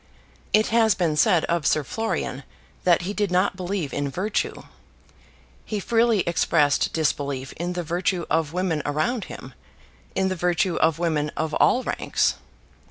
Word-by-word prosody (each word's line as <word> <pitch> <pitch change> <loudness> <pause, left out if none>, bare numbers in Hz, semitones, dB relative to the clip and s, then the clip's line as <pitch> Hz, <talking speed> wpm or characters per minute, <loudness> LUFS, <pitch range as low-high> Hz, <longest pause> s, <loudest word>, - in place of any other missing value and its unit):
It 215 +1 +3
has 225 -3 +4
been 165 -4 0
said 165 +2 +3
of 170 -3 0
Sir 155 - +2
Florian 225 +11 -3 0.4
that 175 -1 +4
he 195 +3 -3
did 205 -1 0
not 185 +2 +1
believe 180 -5 -3
in 140 -1 -1
virtue. 195 +9 -2 1.0
He 215 - -3
freely 230 0 +2
expressed 165 -4 +2
disbelief 140 -4 -2
in 175 +2 -4
the 175 0 -3
virtue 175 +1 -1
of 160 -1 0
women 175 -3 -1
around 175 - -1
him, - - -10 0.6
in 190 0 +1
the 185 - -2
virtue 175 0 +1
of 160 -1 +2
women 155 -3 0
of 160 -1 -2
all 255 - +3
ranks. - - 0
175 Hz, 155 wpm, -24 LUFS, 155-195 Hz, 1.0 s, has